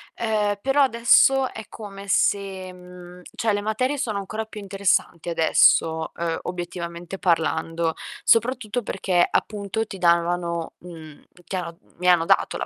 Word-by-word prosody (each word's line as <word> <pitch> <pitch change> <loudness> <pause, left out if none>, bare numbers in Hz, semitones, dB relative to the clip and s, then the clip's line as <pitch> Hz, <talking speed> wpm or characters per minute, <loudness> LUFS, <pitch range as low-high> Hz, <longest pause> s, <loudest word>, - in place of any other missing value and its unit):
Ehm, 210 -2 0
però 275 +2 +3
adesso 260 +1 +4
è 220 -2 -8
come 200 -2 -10
se 190 -1 0
mhmm, 180 0 -13
cioè 220 -2 0
le 205 - -1
materie 255 +7 -1
sono 220 -6 -2
ancora 215 +3 -4
più 215 -1 -10
interessanti 195 -4 0
adesso, 160 0 +3
uhm, 165 -1 -2
obiettivamente 175 0 -6
parlando, 165 -1 0 0.3
soprattutto 235 0 +2
perché, 185 -4 +1
appunto, 210 +1 -2
ti 195 -3 -9
davano, 170 -1 +1
mhmm, 160 -4 -12 0.2
chiaro 175 -3 -5
mhmm, - - -30
mi 180 +1 -2
hanno 175 -2 +5
dato - - +2
la - - -3
190 Hz, 140 wpm, -23 LUFS, 170-215 Hz, 0.3 s, hanno